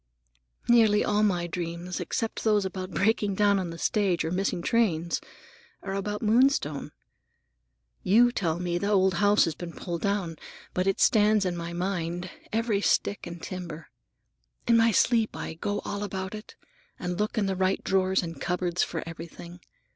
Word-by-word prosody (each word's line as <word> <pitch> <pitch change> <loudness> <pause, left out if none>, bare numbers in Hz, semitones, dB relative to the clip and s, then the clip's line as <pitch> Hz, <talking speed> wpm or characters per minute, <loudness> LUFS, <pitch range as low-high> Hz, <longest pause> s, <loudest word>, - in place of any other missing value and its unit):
Nearly 220 -3 +5
all 210 0 +2
my 180 -5 +2
dreams, 175 +1 -4
except 225 -3 -3
those 210 -3 +3
about 185 -1 -4
breaking 205 0 +1
down 205 0 +3
on 180 -2 -3
the 165 - -7
stage 190 -2 +1
or 160 - -2
missing 180 -1 -1
trains, 175 -8 +1 0.6
are 195 - -4
about 205 +2 -3
Moonstone. 220 - +2 1.1
You 235 +6 +5
tell 170 -8 -1
me 175 -1 -1
the 200 - -1
old 190 -2 +3
house 205 +3 +4
has 165 - -2
been 170 +2 -8
pulled 170 -2 -5
down, 195 -5 -1 0.4
but 185 +1 0
it 195 - +1
stands 210 -2 +4
in 180 -1 -1
my 170 0 -5
mind, 175 -1 -3 0.2
every 225 -2 0
stick 200 -2 0
and 170 0 -7
timber. 170 -4 -7 0.8
In 235 - +5
my 230 0 +5
sleep 225 +1 +2
I - - -5
go 205 +5 -3
all 205 0 -3
about 190 -1 -4
it, 215 0 -9 0.4
and 180 +1 -4
look 210 +1 -1
in 210 - +2
the 195 -1 -1
right 190 +1 0
drawers 190 0 +2
and 165 -4 -7
cupboards 180 0 -1
for 165 - -2
everything. 170 +1 -9
190 Hz, 170 wpm, -27 LUFS, 175-210 Hz, 1.1 s, Nearly